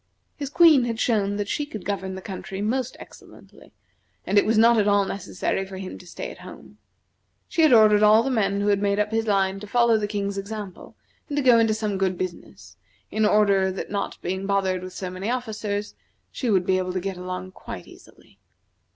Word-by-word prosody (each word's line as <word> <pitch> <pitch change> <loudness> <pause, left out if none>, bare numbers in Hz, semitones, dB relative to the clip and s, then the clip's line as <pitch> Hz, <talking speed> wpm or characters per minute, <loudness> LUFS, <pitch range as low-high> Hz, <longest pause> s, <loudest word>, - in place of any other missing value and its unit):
His 280 -2 -5
Queen 305 -5 +6
had 230 -1 -3
shown 205 -5 +1
that 205 0 -3
she 295 - -1
could 215 -10 -8
govern 190 -1 -3
the 190 - -8
country 195 0 -7
most 245 +5 -2
excellently, - - -15 0.5
and 200 +2 +4
it - - 0
was 220 0 +2
not 230 +1 +5
at 205 - +2
all 200 -1 +3
necessary 195 0 -3
for 190 0 -9
him 190 -1 -7
to 180 - -15
stay - - -7
at - - -13
home. - - -13 0.7
She 335 - 0
had 315 - +5
ordered 215 -3 +6
all 215 +2 +6
the 270 - -1
men 200 -4 0
who 205 - +1
had 200 -1 +2
made 200 0 +1
up 210 +1 0
his 225 0 -1
line 195 -1 +1
to 210 - -9
follow 235 0 +3
the 210 - -2
King's 200 -1 -3
example 200 -2 -8 0.3
and 290 - -3
to 290 - +1
go 245 -3 +6
into 225 -1 +2
some 210 -3 -2
good 190 -2 0
business; 185 -1 -7 0.3
in 215 -1 +2
order 200 -3 +3
that 185 - -6
not 200 -1 -3
being 190 +2 -3
bothered 190 -2 0
with 185 0 -8
so 185 -1 -5
many 185 +4 -4
officers, 215 -4 -3 0.4
she 250 - -3
would 190 -4 +2
be 185 0 +2
able 185 0 -3
to 185 - -1
get 190 0 -4
along 185 +1 -6
quite - - -9
easily. - - -19
205 Hz, 215 wpm, -24 LUFS, 190-220 Hz, 0.7 s, Queen